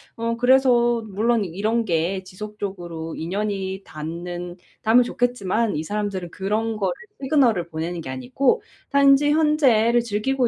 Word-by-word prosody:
어 230 0 -2
그래서 245 -2 +4
물론 215 +2 +1
이런 215 +6 -1
게 175 +2 0
지속적으로 185 -5 -6
인연이 195 +2 -3
닿는 175 +3 -6 0.2
닿으면 230 +3 +5
좋겠지만 235 -3 0
이 150 - -2
사람들은 200 -2 -3
그런 215 +3 -2
거를 190 -4 0 0.3
시그널을 255 - +2
보내는 165 +1 -4
게 135 - -8
아니고 130 - 0 0.3
단지 280 +1 +5
현재를 275 -7 +3
즐기고 235 +4 0
210 Hz, 310 characters per minute, -23 LUFS, 180-240 Hz, 0.3 s, 닿으면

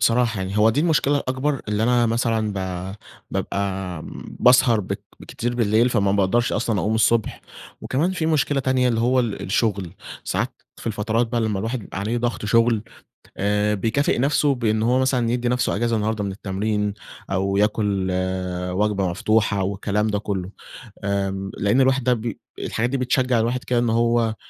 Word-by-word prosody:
بصراحة 115 -2 +2
يعني 95 +2 -2
هو 110 +1 +5
دي 130 +7 0
المشكلة 150 -3 +2
الأكبر 130 +2 -1
اللي 105 +1 0
أنا 120 0 +3
مثلًا 115 -2 0
ب - - -8 0.7
بابقى 95 -3 -3 0.4
باسهر 125 -2 +5
بك 95 - -5 0.3
كتير 120 +1 -3
بالليل 115 0 +3
فما 100 -5 +1
باقدرش 100 +4 +2
أصلًا 110 -3 0
أقوم 110 - 0
الصبح، 110 0 +2 0.4
وكمان 155 +8 0
في 165 -4 -1
مشكلة 145 -3 +1
تانية؛ 130 - -3 0.2
اللي 115 -2 +1
هو 125 +2 +3
ال 115 -4 -3
الشغل 100 -3 0 0.3
ساعات - - -3
في - - -12
الفترات 110 +2 0
بقى 115 0 -1
لمّا 105 -3 0
الواحد 115 +5 -2
بيبقى 100 - -8
عليه 115 +4 -1
ضغط 120 -2 -2
شغل 115 +1 +3 0.5
آآ 105 +1 +1
بيكافئ 115 +7 0
نفسه 140 +1 +2
بأنه 110 -2 0
هو 130 - +3
مثلًا 130 -3 +1
يدّي 120 0 0
نفسه 125 -3 0
إجازة 115 +1 +1
النهارده 110 -1 -1
من 100 - -3
التمرين 105 +1 -2 0.4
أو 95 +1 0
ياكل 105 -2 +1 0.6
وجبة 100 -1 +1
مفتوحة 105 +2 +1
والكلام 100 +2 -1
ده 105 -1 0
كلّه، 95 -3 -3 0.5
آآ 95 -1 -2
لأن 105 +7 +2
الواحد 130 -1 +2
بي 120 -2 -1 0.2
الحاجات 120 +2 -1
دي 135 - -1
بتشجع 125 -1 +1
الواحد 120 +3 -1
كده 120 -1 +1
إن 120 - +1
هو 115 -1 +2
110 Hz, 165 wpm, -22 LUFS, 100-120 Hz, 0.7 s, هو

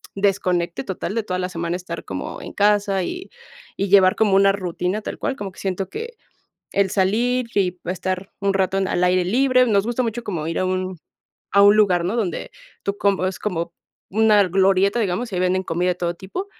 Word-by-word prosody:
desconecte 185 -3 0
total 190 -2 -4
de 230 - 0
toda 185 -3 -3
la 180 - -1
semana 170 -1 -3
estar 175 -2 -7
como 95 -1 -6
en - - -8
casa 205 -2 +2
y 360 - -6 0.5
y 200 - 0
llevar 185 -1 +6
como 210 -3 +3
una 195 0 +5
rutina 185 +1 -2
tal - - -6
cual, 270 - -2
como 195 -2 -5
que - - -15
siento 190 -1 -3
que 470 +2 -6 0.6
el 200 -1 +2
salir 235 +7 +1
y 185 -3 +2
pues 180 0 -5
estar 185 +1 -4
un 200 -1 +1
rato 190 0 +1
en 190 -1 0
al 180 - +1
aire 180 0 +3
libre, 255 +4 +3
nos 200 -4 +2
gusta 240 +1 0
mucho 230 +1 -3
como 170 -8 -3
ir 165 - -2
a - - +1
un 185 -1 -2 0.5
a 200 0 +6
un 205 +1 +7
lugar, 185 -5 +3
¿no? 185 +5 -1
Donde 225 - -2 0.3
tú 200 0 -1
como 195 -2 +1
es 185 - -3
como 170 -5 -3 0.4
una 215 -2 +5
glorieta, 195 +4 +3
digamos, 215 +3 -2
y - - -2
ahí - - 0
venden 185 +1 +1
comida 175 +1 -1
de - - 0
todo 175 -1 -1
tipo. 195 - -6
195 Hz, 215 wpm, -22 LUFS, 180-210 Hz, 0.6 s, un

